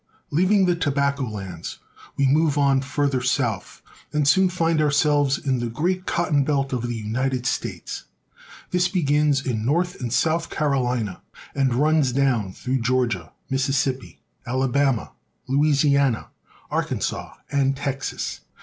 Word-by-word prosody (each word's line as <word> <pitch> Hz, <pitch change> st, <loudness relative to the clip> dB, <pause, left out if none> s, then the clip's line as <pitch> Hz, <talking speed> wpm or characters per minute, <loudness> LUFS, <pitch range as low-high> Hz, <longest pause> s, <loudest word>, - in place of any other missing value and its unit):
LEAVING 185 Hz, +5 st, +3 dB
the 175 Hz, -1 st, +2 dB
tobacco 140 Hz, -3 st, 0 dB
lands, 95 Hz, -6 st, -6 dB, 0.4 s
we 140 Hz, -, +3 dB
move 150 Hz, +2 st, +3 dB
on 140 Hz, -2 st, +3 dB
farther 140 Hz, -1 st, 0 dB
south, 120 Hz, -5 st, -1 dB
^ -, -, -22 dB
and 150 Hz, -2 st, +2 dB
soon 190 Hz, +5 st, +5 dB
find 165 Hz, -3 st, +1 dB
ourselves 145 Hz, -1 st, +3 dB
in 130 Hz, -3 st, -1 dB
the 120 Hz, -1 st, -2 dB
great 180 Hz, +10 st, -1 dB
cotton 150 Hz, -5 st, +1 dB
belt 135 Hz, -1 st, 0 dB
of 125 Hz, -, -1 dB
the 120 Hz, 0 st, -3 dB
United 125 Hz, +4 st, -2 dB
States. -, -, -3 dB, 0.7 s
This 180 Hz, 0 st, +3 dB
begins 150 Hz, -5 st, +1 dB
in 110 Hz, -4 st, -1 dB
North 170 Hz, +8 st, 0 dB
and 120 Hz, -2 st, -3 dB
South 165 Hz, +6 st, +1 dB
CaroHna 125 Hz, -8 st, -1 dB, 0.3 s
and 135 Hz, -3 st, +1 dB
runs 150 Hz, -1 st, +3 dB
down 125 Hz, -8 st, +1 dB
through 125 Hz, +6 st, -2 dB
Georgia, 115 Hz, -8 st, 0 dB, 0.2 s
Mississippi, 135 Hz, -1 st, -1 dB, 0.2 s
Alabama, 130 Hz, -1 st, 0 dB, 0.4 s
Louisiana, 140 Hz, -2 st, +2 dB, 0.4 s
Arkansas, -, -, -2 dB, 0.2 s
and 135 Hz, -1 st, +1 dB
Texas. 135 Hz, -1 st, -3 dB
140 Hz, 130 wpm, -23 LUFS, 125-150 Hz, 0.7 s, soon